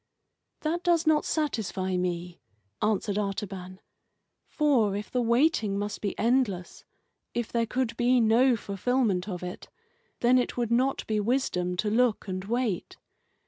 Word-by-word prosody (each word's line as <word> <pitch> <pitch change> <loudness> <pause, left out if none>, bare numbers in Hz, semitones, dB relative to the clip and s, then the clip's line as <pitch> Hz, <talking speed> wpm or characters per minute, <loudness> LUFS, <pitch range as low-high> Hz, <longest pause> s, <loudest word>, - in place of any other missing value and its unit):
"That 330 +3 -1
does 345 -2 +2
not 310 -1 +3
satisfy 195 - -1
me," 180 -1 -3 0.4
answered 210 -1 0
Artaban, 195 -2 -4 0.7
"for, 255 -10 +2
if 205 +1 -5
the 250 - +1
waiting 235 -4 +2
must 205 +1 -4
be 200 - -3
endless, 225 -7 0 0.5
if 240 -2 -2
there 230 -1 +1
could 250 -1 -1
be 250 +1 +3
no 235 +3 +4
fulfilment 205 -2 0
of 180 -2 -5
it, 180 0 -7 0.5
then 250 +1 +5
it 245 - -2
would 235 -2 -1
not 260 +3 +1
be 215 -1 0
wisdom 200 -6 0
to 210 +2 0
look 230 -2 +2
and 185 0 -3
wait. 230 -4 -2
220 Hz, 140 wpm, -27 LUFS, 195-250 Hz, 0.7 s, then